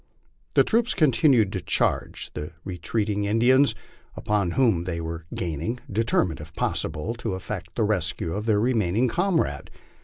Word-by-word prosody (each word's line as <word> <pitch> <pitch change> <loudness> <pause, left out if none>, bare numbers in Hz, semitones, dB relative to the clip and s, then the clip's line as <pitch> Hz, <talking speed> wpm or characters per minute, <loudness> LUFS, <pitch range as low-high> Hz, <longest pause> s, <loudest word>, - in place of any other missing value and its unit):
The - - +7
troops 230 +2 +1
continued 130 - +4
to 95 - -2
charge 85 - -1
the 75 +1 -6
retreating 105 +3 -2
Indians, 120 +4 +4 0.4
upon 100 -5 0
whom 110 -10 +3
they 85 -2 -3
were 80 0 -5
gaining, 85 - -3
determined 100 -5 +1
if 80 +1 -12
possible 80 +8 -2
to 115 -5 -4
effect 95 +1 -6
the 115 - +1
rescue 85 -5 0
of 105 +2 -4
their 105 -2 +3
remaining 110 -3 +1
1 - - +1
comrade. 175 +1 0
105 Hz, 150 wpm, -25 LUFS, 85-120 Hz, 0.4 s, The